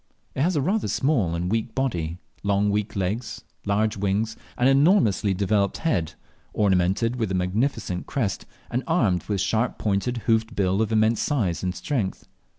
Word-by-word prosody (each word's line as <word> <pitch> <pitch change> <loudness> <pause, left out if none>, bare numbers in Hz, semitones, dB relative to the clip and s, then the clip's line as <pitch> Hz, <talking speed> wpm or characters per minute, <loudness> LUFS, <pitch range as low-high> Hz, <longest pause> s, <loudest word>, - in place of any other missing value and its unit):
It - - -2
has 175 +4 +2
a 145 - +1
rather 205 +8 0
small 120 - +1
and 90 +2 -2
weak 115 +1 -1
body, 90 -12 -1 0.2
long 100 0 +1
weak 105 +1 -1
legs, 105 +4 -3 0.2
large 105 +2 +1
wings, 100 +3 0 0.2
and 125 - +3
an 135 - +5
enormously 135 - +3
developed 100 +1 +1
head, 85 - -1 0.4
ornamented 100 +4 +2
with 110 -4 -1
a 95 - -1
magnificent 90 0 -1
crest, 110 -8 -2 0.2
and 125 - 0
armed 110 - +2
with 105 - -1
a - - -1
sharp 115 +2 0
pointed 105 +4 -1
hoofed 115 0 +1
bill 95 +1 +1
of 110 0 0
immense 110 +1 +3
size 105 - 0
and 90 0 -2
strength. 115 -10 -3
105 Hz, 170 wpm, -24 LUFS, 95-125 Hz, 0.4 s, an